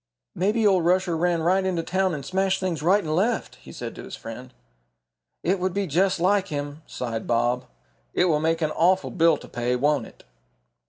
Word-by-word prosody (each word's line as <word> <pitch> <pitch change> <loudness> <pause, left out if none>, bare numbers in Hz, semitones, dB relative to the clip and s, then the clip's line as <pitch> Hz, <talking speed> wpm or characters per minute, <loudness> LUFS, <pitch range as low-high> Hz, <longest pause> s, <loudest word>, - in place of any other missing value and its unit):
"Maybe 210 +5 +1
old 190 -4 +4
Rusher 180 0 +2
ran 170 0 +1
right 185 +3 +3
into 180 -3 -1
town 190 -1 0
and 140 -2 -7
smashed 190 +2 0
things 180 -5 -2
right 190 +6 +3
and 155 -1 -1
left," 220 +7 0
he - - -13
said - - -6
to - - -9
his - - -8
friend. 125 +3 -9 0.9
"It 185 +3 +1
would 185 0 -1
be 200 0 0
just 185 +3 +1
like 195 +2 +2
him," 145 0 -5
sighed 115 -3 -4
Bob. 120 +2 +1 0.5
"It - - +2
will 155 -4 +2
make 165 +1 0
an 155 - 0
awful 185 +4 +2
bill 165 -3 +4
to - - -12
pay, 120 +1 -1
won't 140 -2 +1
it?" - - -18
170 Hz, 200 wpm, -25 LUFS, 150-190 Hz, 0.9 s, old